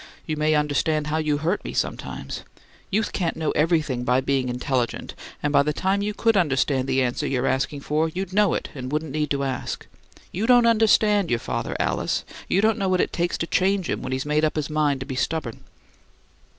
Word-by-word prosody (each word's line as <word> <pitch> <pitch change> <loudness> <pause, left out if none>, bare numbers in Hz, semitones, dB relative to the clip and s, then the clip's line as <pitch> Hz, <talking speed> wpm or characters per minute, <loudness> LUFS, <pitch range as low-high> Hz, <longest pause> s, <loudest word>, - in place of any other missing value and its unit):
"You 155 - -2
may 155 0 +2
understand 150 +1 +1
how 150 +1 -1
you 155 -2 +1
hurt 165 +7 -1
me - - -6
sometimes. - - -3 0.5
Youth 210 +2 0
can't 170 -4 -1
know 160 -1 0
everything 155 -6 +1
by 125 +1 +3
being 130 -1 0
intelligent, 125 0 -2 0.3
and 145 0 0
by 140 - +6
the 150 +1 0
time 190 +5 0
you 210 0 -2
could 225 0 +2
understand 135 -6 +2
the 130 0 +2
answer 125 -1 -1
you're 130 -1 0
asking 135 +2 0
for 155 +3 0
you'd 185 +2 -5
know 205 -2 +3
it, - - -4
and 130 -2 -6
wouldn't 155 0 -2
need 150 0 -1
to 140 -1 0
ask. 130 -2 -3 0.5
You 205 +6 -2
don't 245 -1 +6
understand 215 -4 +4
your 120 - +2
father, - - -3
Alice; - - -1 0.2
you 195 - +2
don't 220 0 +2
know 195 -1 0
what 185 -1 +2
it - - 0
takes 175 0 0
to - - -1
change 190 +1 +1
him - - -2
when 130 - -5
he's 130 +1 -2
made 150 +1 +1
up 155 - +1
his 155 -1 -2
mind 150 -3 +1
to - - -4
be 130 -2 -5
stubborn." 140 -4 -3
155 Hz, 215 wpm, -24 LUFS, 135-185 Hz, 0.5 s, by